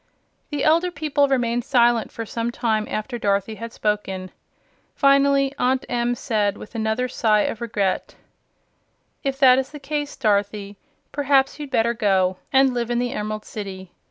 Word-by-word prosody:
The 290 -2 -2
elder 335 +3 +3
people 290 -3 +1
remained 240 -3 0
silent 240 -3 +2
for 230 - -6
some 230 +2 -3
time 220 -3 -1
after 235 +3 -4
Dorothy 200 0 0
had 230 +1 -7
spoken. 195 -4 -2 0.6
Finally, 275 0 +4
Aunt 260 +1 +1
Em 240 0 0
said, 210 -5 0
with - - -11
another 220 +2 -1
sigh 215 -4 +2
of 220 - -2
regret: 205 -5 -1 1.1
"If 270 -2 -1
that 260 -2 +6
is 265 0 -3
the 300 - -9
case, 290 +1 -3
Dorothy, 205 -3 0 0.4
perhaps 280 0 +2
you'd 295 -2 -6
better 235 -3 +2
go 190 -5 +1
and 265 -1 +4
live 240 -1 -2
in 240 - 0
the 245 0 -1
Emerald 215 0 -4
City. 190 -3 -7
235 Hz, 155 wpm, -22 LUFS, 210-270 Hz, 1.1 s, that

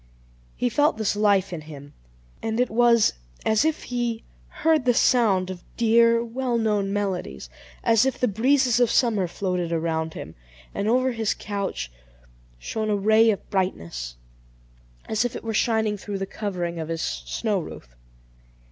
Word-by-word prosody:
He 250 - 0
felt 290 +2 +2
this 215 -2 0
life 200 -3 +2
in 165 - -5
him, 145 -2 -11 0.5
and 225 +1 -2
it 250 - +1
was 235 -1 +4 0.3
as 220 +2 +3
if 315 -1 0
he 240 -2 -2 0.2
heard 315 -5 +1
the 245 -2 +3
sound 195 -9 +3
of 180 -2 -9
dear, 230 0 +4
well 245 +1 -1
known 210 -3 0
melodies, 180 - -3 0.3
as 225 -1 +4
if 265 0 0
the 250 - +1
breezes 250 +3 +2
of 245 -2 +4
summer 215 -7 +2
floated 180 -1 -2
around 160 -1 -1
him; 80 - -8 0.4
and 200 - -2
over 255 +3 +2
his 225 -3 -1
couch 200 - -4 0.7
shone 215 - -3
a 210 - +2
ray 220 +3 +4
of 205 - -1
brightness, 80 - -2 0.9
as 220 +1 +1
if 245 - -3
it - - -6
were 225 -1 -3
shining 220 -1 +1
through 200 0 -5
the 195 - -3
covering 180 -5 -4
of 160 - -4
his 165 0 -2
snow 215 -4 -2
roof. - - -10
215 Hz, 160 wpm, -24 LUFS, 185-235 Hz, 0.9 s, was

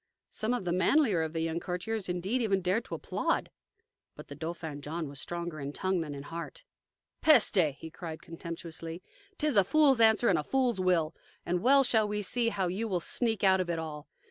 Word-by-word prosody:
Some 225 +3 -1
of 200 - -4
the 175 - 0
manlier 185 - +3
of 160 0 -3
the 165 - -2
young 165 +1 -1
courtiers 185 +4 -4
indeed 190 +8 -1
even 195 -4 +1
dared 185 +6 +1
to - - -5
applaud. - - -2 0.6
But - - -12
the 145 - -7
Dauphin 160 -1 -6
John 160 +2 -4
was 140 0 -6
stronger 170 -2 -5
in 140 +1 -5
tongue 185 0 0
than 150 -3 -5
in 140 - -7
heart. 165 +3 -7 0.6
"Peste!" 185 - +4
he 160 - -9
cried 160 -2 -7
contemptuously. 165 0 -7 0.3
"'T 305 - 0
is 295 -8 +2
a 200 - +7
fool's 275 +2 +5
answer 220 +1 +5
and - - +3
a - - -2
fool's 255 -6 +1
will. 175 -4 +2 0.3
And 175 0 0
well 275 +3 +6
shall 220 -4 +3
we 210 0 -2
see 235 +4 +1
now 230 - -6
how 190 -2 0
you 200 +6 -2
will 185 -4 0
sneak 225 +5 -1
out 190 -1 +5
of 180 - -4
it 170 - -1
all. 155 -2 -6
180 Hz, 215 wpm, -30 LUFS, 165-220 Hz, 0.6 s, a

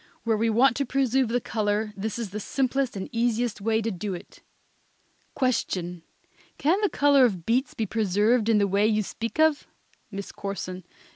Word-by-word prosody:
Where 225 -1 +2
we 225 +2 +1
want 240 +3 +4
to 280 - +1
preserve 265 -1 +2
the 240 +2 0
color 210 -2 -1
this 210 +3 -4
is 230 -5 -4
the 210 - -4
simplest 265 +1 -1
and 190 - -4
easiest 235 -2 0
way 220 +1 +1
to 225 - -1
do 190 +1 -4
it. 175 - -12 0.9
Question. 180 - -1 0.6
Can 345 +8 +2
the 410 - +2
color 285 -2 +4
of 190 -9 +1
beets 250 +4 0
be 220 - -1
preserved 215 +2 +1
in 225 - +4
the 205 - +3
way 200 +2 +2
you 215 -1 +1
speak 230 +8 -5
of? 315 -2 +3 0.4
MISS 200 -2 -6
CORSON. 185 -2 -6
225 Hz, 175 wpm, -26 LUFS, 205-250 Hz, 0.9 s, want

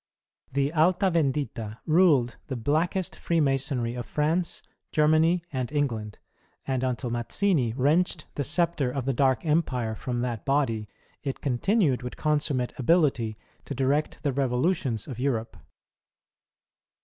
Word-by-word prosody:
The 140 +2 +1
Alta 180 +4 +3
Vendita 135 -8 -1
ruled 155 -8 +4
the 135 - -3
blackest 160 - 0
Freemasonry 135 -6 0
of 120 -1 -5
France, 160 +3 -1 0.3
Germany, 160 +3 +3
and 130 -1 -2
England; 115 -8 -2 0.5
and 130 -1 -1
until 125 -1 -2
Mazzini 120 - +1
wrenched 155 +5 +1
the 145 - -2
sceptre 155 -2 +1
of 130 0 -3
the 135 - +1
dark 130 +4 +2
Empire 130 -8 0
from 120 +2 -3
that 120 -3 -3
body, 130 -7 0 0.3
it 135 -2 -4
continued 145 - +1
with 125 0 -7
consummate 145 -5 0
ability 130 -7 +2 0.3
to 140 - -5
direct 140 +6 0
the 140 -3 0
revolutions 130 - 0
of 125 -5 -7
Europe. 120 -4 -1
135 Hz, 125 wpm, -27 LUFS, 125-155 Hz, 0.5 s, ruled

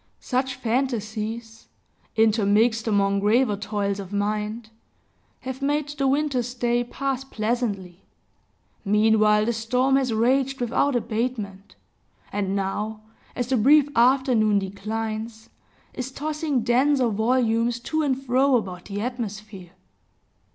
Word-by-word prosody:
Such 255 0 -1
fantasies, 225 -2 -3 0.5
intermixed 220 +1 +3
among 200 -2 +2
graver 215 +2 +2
toils 200 0 -2
of 195 -1 -8
mind, 210 +2 -2 0.7
have 260 +1 -6
made 290 +1 0
the 290 -2 -1
winter's 265 -3 0
day 240 0 +1
pass 270 +1 -3
pleasantly. 215 -7 -3 0.8
Meanwhile, 210 0 +3
the 235 - 0
storm 250 +4 +1
has 260 -3 0
raged 260 +4 +1
without 250 +3 +1
abatement, 220 -4 -3 0.6
and 195 -1 -1
now, 210 +2 -3 0.3
as 245 - -1
the 260 - +2
brief 285 +5 +5
afternoon 240 -4 +3
declines, 220 +3 -4 0.4
is 255 +1 -5
tossing 300 -2 -2
denser 255 +1 +3
volumes 230 +1 +1
to 315 +5 -1
and 270 -3 0
fro 265 +1 +3
about 185 -6 -3
the 205 0 -4
atmosphere. 215 -6 -6
230 Hz, 115 wpm, -24 LUFS, 210-260 Hz, 0.8 s, brief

